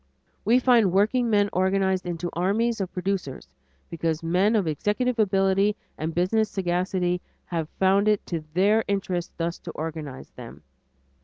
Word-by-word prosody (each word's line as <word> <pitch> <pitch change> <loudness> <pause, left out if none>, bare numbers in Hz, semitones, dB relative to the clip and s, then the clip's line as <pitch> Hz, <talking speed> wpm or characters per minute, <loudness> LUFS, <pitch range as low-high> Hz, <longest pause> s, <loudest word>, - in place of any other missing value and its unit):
We 230 +5 +4
find 240 -6 +4
workingmen 210 +1 +2
organized 190 0 +1
into 175 0 -3
armies 210 +6 0
of 185 - -3
producers 180 - -3 0.4
because 165 -1 -2
men 185 +7 +2
of 205 -4 +2
executive 210 - -1
ability 195 0 +2 0.2
and 160 +1 -4
business 210 +5 +1
sagacity 180 -1 -1 0.2
have 165 -3 -3
found 195 +2 +3
it 210 -1 +2
to 165 -3 -4
their 210 +4 +3
interests 185 -3 -2
thus 170 0 -2
to 170 - -8
organize 155 -4 -6
them. 120 -2 -11
190 Hz, 140 wpm, -25 LUFS, 170-205 Hz, 0.4 s, We